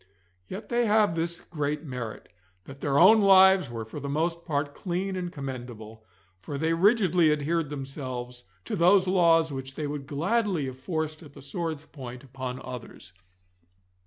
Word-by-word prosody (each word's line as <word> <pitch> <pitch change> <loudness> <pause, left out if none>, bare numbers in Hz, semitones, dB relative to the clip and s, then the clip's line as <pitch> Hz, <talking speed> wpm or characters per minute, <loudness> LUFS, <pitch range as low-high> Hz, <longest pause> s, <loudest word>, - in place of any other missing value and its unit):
Yet 195 +4 -8
they 240 -1 +2
have 210 -4 +4
this 170 +1 -2
great 150 -2 -3
merit, 125 -6 -6 0.4
that 135 0 -12
their 140 -1 +1
own 210 +7 +7
lives 190 -4 +6
were 115 -2 -5
for 110 +7 -8
the 140 0 -5
most 165 +3 -1
part 145 -3 -1
clean 185 +3 -3
and 180 -1 -4
commendable, 120 -7 -8 0.4
for 140 +10 -6
they 160 +3 +1
rigidly 180 -3 +4
adhered 150 +1 0
themselves 130 -3 -6 0.2
to - - -3
those 185 +2 +4
laws 165 -4 +4
which 135 0 -6
they 155 - -3
would 145 -1 -5
gladly 185 +2 0
have 130 -1 -7
forced 155 +1 -3
at 145 -4 -13
the - - -12
sword's 160 +1 -4
point 125 -4 -9
upon 130 -1 -6
others. 120 -7 -9
150 Hz, 160 wpm, -27 LUFS, 135-175 Hz, 0.4 s, own